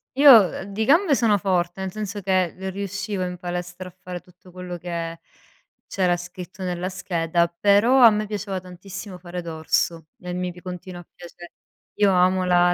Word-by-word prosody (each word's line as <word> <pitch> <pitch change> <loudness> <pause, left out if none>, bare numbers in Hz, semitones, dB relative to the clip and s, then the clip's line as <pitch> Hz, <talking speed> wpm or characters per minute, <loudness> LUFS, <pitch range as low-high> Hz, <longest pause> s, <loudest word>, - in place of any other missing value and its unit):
Io, 280 +1 +7
uhm, 215 -8 +7
di 220 - -1
gambe 315 - +4
sono 225 -5 +3
forte, 180 -2 -1
nel 190 0 -3
senso 210 -1 -4
che 185 -2 +1 0.2
riuscivo 200 0 -4
in 180 0 -4
palestra 180 0 -5
a 180 - -12
fare 180 -1 -6
tutto 180 +1 -20
quello 180 0 -7
che 170 -1 -5 0.7
c'era 180 -2 +1
scritto 180 +2 -9
nella 180 0 -2
scheda, 170 -3 0
però 205 +9 +3
a 230 - +11
me 215 0 -1
piaceva 200 -2 -4
tantissimo 185 +2 -9
fare 180 0 -7
dorso, 160 0 -1
e 180 -1 -6
mi 180 0 -3
p 180 - -13
continua 180 0 -8
a 175 - -14
piace 175 0 -12 0.4
io 205 -2 +3
amo 185 0 +3
la 175 0 +4
180 Hz, 175 wpm, -23 LUFS, 175-200 Hz, 0.7 s, a